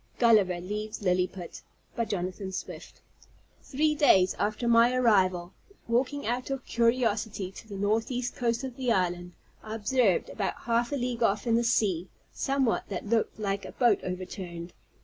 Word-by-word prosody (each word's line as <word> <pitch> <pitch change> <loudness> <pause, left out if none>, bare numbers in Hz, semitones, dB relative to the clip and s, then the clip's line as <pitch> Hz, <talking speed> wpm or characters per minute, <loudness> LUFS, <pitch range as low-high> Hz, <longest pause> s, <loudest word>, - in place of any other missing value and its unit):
GULLIVER 210 -7 +4
LEAVES 210 +3 -5
LILLIPUT 180 -1 -1 0.3
By 230 - 0
Jonathan 190 -1 -4
Swift 185 - -8 0.6
Three 305 +2 0
days 195 - +4
after 215 +3 -1
my 235 +1 +5
arrival, 190 -7 +2 0.3
walking 255 +5 0
out 245 +3 -2
of 270 -1 -4
curiosity 225 -5 0
to 220 - -12
the 205 - -8
northeast 225 +5 -1
coast 235 +1 -1
of 260 -2 -6
the 255 -3 0
island, 180 -3 0 0.3
I 220 0 -6
observed, 225 -3 +1
about 200 -3 -3
half 235 +2 0
a - - 0
league 245 -2 -2
off, 215 -1 +1
in 230 - +1
the 235 +1 +3
sea, 190 -6 +1 0.2
somewhat 270 -4 0
that 195 -1 -4
looked 225 -1 0
like 200 -1 -2
a - - -8
boat 235 -5 +3
overturned. 180 -1 -6
220 Hz, 155 wpm, -28 LUFS, 190-240 Hz, 0.6 s, my